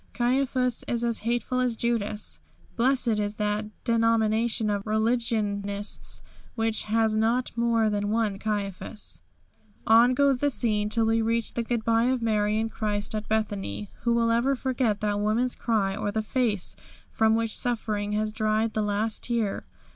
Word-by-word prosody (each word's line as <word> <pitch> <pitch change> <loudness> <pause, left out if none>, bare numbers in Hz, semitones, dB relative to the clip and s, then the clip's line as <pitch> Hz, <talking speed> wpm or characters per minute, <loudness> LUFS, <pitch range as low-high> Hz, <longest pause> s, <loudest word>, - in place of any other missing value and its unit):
Caiaphas 250 0 0
is 235 -1 -1
as 235 -1 0
hateful 240 +3 -1
as 250 -2 +1
Judas. 215 -3 -2 0.4
Blessed 245 -3 +2
is 205 +1 -2
that 210 0 -1 0.2
denomination 230 -1 +2
of 205 +1 -3
religionists 215 -3 -1 0.3
which 225 -1 +1
has 220 0 +1
not 230 +3 +1
more 230 -1 +2
than 205 -1 -1
one 215 -3 0
Caiaphas! 205 -1 -4 0.6
On 235 +3 +6
goes 280 -2 +3
the 290 - +2
scene 215 -5 0
till 225 +1 +2
we 225 0 +2
reach 230 0 -1
the 235 - -1
goodby 230 0 +1
of 260 - 0
Mary 215 -2 +1
and 225 0 -2
Christ 210 -1 -2
at 215 0 -4
Bethany. 200 - -2
Who 235 0 +1
will 230 -1 +2
ever 245 +4 +2
forget 250 -5 -1
that 205 -1 0
woman's 225 +4 +1
cry, 205 -4 0
or 205 0 -2
the 220 +1 -1
face 215 -4 0 0.3
from 220 0 +2
which 225 -1 +1
suffering 215 -4 -1
has 215 0 -1
dried 215 +1 0
the 215 - 0
last 210 +1 -1
tear? 230 -4 -1
220 Hz, 155 wpm, -26 LUFS, 210-235 Hz, 0.6 s, On